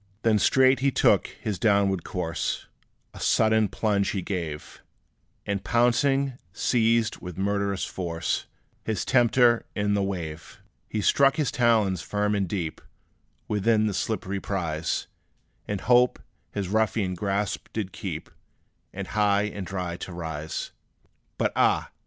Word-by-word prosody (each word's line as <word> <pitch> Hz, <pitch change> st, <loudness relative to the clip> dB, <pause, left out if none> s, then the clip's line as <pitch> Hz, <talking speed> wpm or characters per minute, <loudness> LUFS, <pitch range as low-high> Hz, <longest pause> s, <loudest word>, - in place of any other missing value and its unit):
Then 110 Hz, -2 st, +4 dB
straight 130 Hz, +4 st, +4 dB
he 140 Hz, +1 st, +3 dB
took -, -, +3 dB
his 105 Hz, -5 st, -5 dB
downward 100 Hz, -3 st, +2 dB
course; 85 Hz, -5 st, -3 dB, 0.5 s
A -, -, -11 dB
sudden 110 Hz, -1 st, +3 dB
plunge 100 Hz, -1 st, 0 dB
he 95 Hz, -3 st, -2 dB
gave; 85 Hz, -6 st, -5 dB, 0.6 s
And 100 Hz, -1 st, -2 dB
pouncing, 125 Hz, +4 st, +2 dB
seized, 115 Hz, +1 st, +2 dB
with 90 Hz, -2 st, -8 dB
murderous 100 Hz, 0 st, 0 dB
force, 85 Hz, -2 st, -3 dB, 0.4 s
His 110 Hz, -2 st, -2 dB
tempter 120 Hz, -1 st, +4 dB
in 105 Hz, 0 st, +1 dB
the 100 Hz, -, +2 dB
wave. 85 Hz, -5 st, -5 dB, 0.3 s
He 110 Hz, -, -2 dB
struck 135 Hz, +6 st, +4 dB
his 150 Hz, -7 st, 0 dB
talons 110 Hz, -7 st, +2 dB
firm 105 Hz, 0 st, -1 dB
and 100 Hz, -3 st, 0 dB
deep, 80 Hz, -5 st, -3 dB, 0.7 s
Within 110 Hz, +1 st, +2 dB
the 105 Hz, -, 0 dB
slippery 100 Hz, -1 st, -2 dB
prize, 85 Hz, -6 st, -2 dB, 0.6 s
In 105 Hz, -, -1 dB
hope 125 Hz, +4 st, +4 dB, 0.3 s
his 100 Hz, -2 st, -3 dB
ruffian 105 Hz, -1 st, +1 dB
grasp 100 Hz, +2 st, -2 dB
to 110 Hz, -, -1 dB
keep; 95 Hz, -4 st, -6 dB, 0.6 s
And 95 Hz, 0 st, -6 dB
high 105 Hz, -1 st, +2 dB
and 100 Hz, -3 st, -5 dB
dry 90 Hz, -3 st, -3 dB
to 95 Hz, -, -7 dB
rise. 80 Hz, -2 st, -5 dB, 0.7 s
But -, -, +1 dB
ah! -, -, +2 dB
100 Hz, 135 wpm, -26 LUFS, 90-110 Hz, 0.7 s, Then